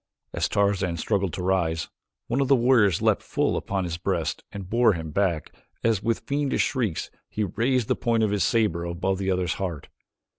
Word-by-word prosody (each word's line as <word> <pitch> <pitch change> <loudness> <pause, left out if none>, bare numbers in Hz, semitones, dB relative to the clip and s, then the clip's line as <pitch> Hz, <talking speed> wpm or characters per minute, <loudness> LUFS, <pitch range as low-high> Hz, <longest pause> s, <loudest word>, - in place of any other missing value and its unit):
As - - 0
Tarzan 100 -4 +1
struggled 100 +1 0
to 90 - -4
rise, 85 -4 0 0.4
one 125 +4 0
of 135 - +1
the 135 - +6
warriors 115 -7 +3
leaped - - +3
full - - 0
upon 95 -1 -2
his 85 -2 -3
breast - - -2
and 100 -2 -7
bore 115 +1 +4
him 80 -3 -5
back 90 -3 0 0.3
as, 115 -4 +2
with 115 +1 0
fiendish 140 -1 0
shrieks, 115 - -2 0.2
he 110 - -2
raised 115 +5 0
the - - +2
point 115 -1 +1
of 105 - +1
his 100 -3 +1
saber 105 -6 +1
above 90 +3 -1
the 95 -1 -1
other's 90 -2 +1
heart. 85 -6 -4
100 Hz, 190 wpm, -25 LUFS, 90-115 Hz, 0.4 s, the